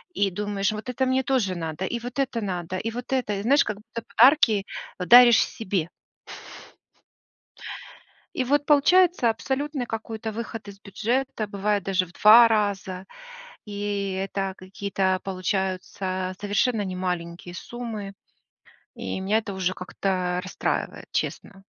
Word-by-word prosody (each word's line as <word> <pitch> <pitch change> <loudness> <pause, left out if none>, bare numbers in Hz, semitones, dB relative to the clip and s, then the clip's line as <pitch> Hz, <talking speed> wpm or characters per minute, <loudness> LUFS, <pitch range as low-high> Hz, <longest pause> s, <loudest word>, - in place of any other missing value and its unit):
и 200 -2 +1
думаешь, 205 +1 -1
вот 215 +4 -6
это 260 +1 0
мне 260 0 +2
тоже 230 -8 0
надо, 165 +2 -4
и 235 +5 -3
вот 250 +3 -6
это 255 -4 0
надо, 180 -2 -3
и 225 +4 -3
вот 245 +3 -7
это. 250 -5 0
И - - -3
знаешь, 280 +5 +5
как 210 -1 -4
будто 230 +2 -8
подарки 235 -6 +6 0.3
вот 180 - -4
даришь 240 -1 +9
себе. 185 -6 -3 2.5
И 260 - 0
вот 290 +3 +1
получается 315 -2 +4
абсолютный 265 +4 -2
какой-то 220 0 -5
выход 225 -1 -6
из 200 0 -11
бюджета, 230 +3 -2
бывает 205 -1 -1
даже 185 -1 +1
в 175 - -17
2 230 +3 +8
раза, 195 -4 -1 0.6
и 205 -1 -3
это 195 0 -2
какие-то 190 0 -1
получаются 185 0 -2
совершенно 205 +2 +1
не 185 -1 -4
маленькие 175 -1 -4
суммы, 220 -2 -6 0.8
и - - -4
меня 205 +3 +2
это 210 -3 -5
уже 185 -1 -1
как-то 180 -1 -2
расстраивает, 185 - -3
честно. 195 -2 -3
205 Hz, 140 wpm, -25 LUFS, 190-235 Hz, 2.5 s, даришь